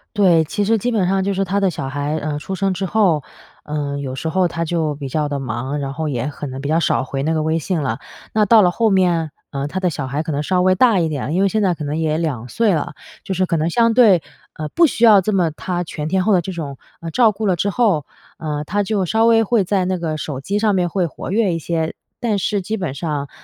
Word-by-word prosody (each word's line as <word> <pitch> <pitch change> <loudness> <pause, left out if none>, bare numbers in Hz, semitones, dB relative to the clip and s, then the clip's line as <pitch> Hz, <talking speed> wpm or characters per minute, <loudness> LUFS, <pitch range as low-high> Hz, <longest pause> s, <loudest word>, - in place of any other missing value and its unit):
对， 180 -6 +5
其 205 +6 -2
实 225 +2 +3
基 235 +4 -1
本 205 -6 +1
上 190 0 +1
就 200 - 0
是 195 0 0
她 195 +2 0
的 195 -1 +2
小 135 -5 -5
孩， 145 +2 -2
呃， 150 -1 -3
出 190 +5 -5
生 195 0 0
之 190 +2 -3
后， 180 -8 +2 0.4
呃， 145 -1 -3
有 130 -2 -4
时 160 - -4
候 180 +2 +2
她 165 0 -3
就 160 -3 -1
比 140 -1 -6
较 150 +2 -1
地 145 - -2
忙， 130 +3 -3
然 135 -1 -4
后 160 +1 -3
也 125 -2 -2
可 145 0 -6
能 130 0 -6
比 140 - -4
较 160 +2 +2
少 150 - +1
回 135 +1 -4
那 160 - 0
个 155 -1 0
微 160 +1 +1
信 165 0 -2
了。 130 -1 -2 0.3
那 215 -1 +3
到 220 +1 +6
了 180 - +4
后 225 +4 +2
面， 175 -5 +2 0.2
呃， 140 0 -3
她 190 +5 -3
的 185 - +1
小 140 -3 -4
孩 145 +4 -2
可 160 - -4
能 145 - -1
稍 180 +4 +1
微 185 0 +4
大 215 -1 +4
一 165 - +1
点， 145 -1 -3
因 190 - +3
为 - - +4
现 215 +2 0
在 185 -3 +2
可 155 - -6
能 145 +1 -2
也 155 -1 0
2 140 -8 -2
岁 220 - +2
了， 150 -1 -2 0.3
就 190 - -3
是 185 - +2
可 175 -2 -1
能 160 +1 +1
相 230 +5 +3
对， 210 -9 +5 0.3
呃， 155 -1 -5
不 335 - +4
需 235 -3 +2
要 210 -3 +7
这 215 +4 -1
么 180 -5 +2
她 175 +3 -3
全 155 -2 -5
天 185 +3 +1
候 215 - +3
地 180 - +4
这 190 - -5
种， 150 -6 -6 0.2
呃， 165 -1 -5
照 230 0 +4
顾 215 +2 -4
了 185 -3 +2
之 200 +5 0
后， 195 - +1 0.3
呃， 150 -2 -3
她 205 +7 -1
就 200 -2 0
稍 220 +5 +2
微 225 -1 +5
会 220 -1 +2
在 190 0 0
那 185 0 0
个 155 -2 -2
手 145 -3 -5
机 200 +9 -2
上 210 -1 +2
面 180 -2 +1
会 180 0 0
活 160 - -7
跃 205 -4 +2
一 165 - -2
些。 160 0 -2 0.3
但 220 -4 +1
是 200 +1 0
基 215 +4 -3
本 180 -10 -3
上， 145 -2 -3
170 Hz, 295 characters per minute, -19 LUFS, 150-195 Hz, 0.4 s, 要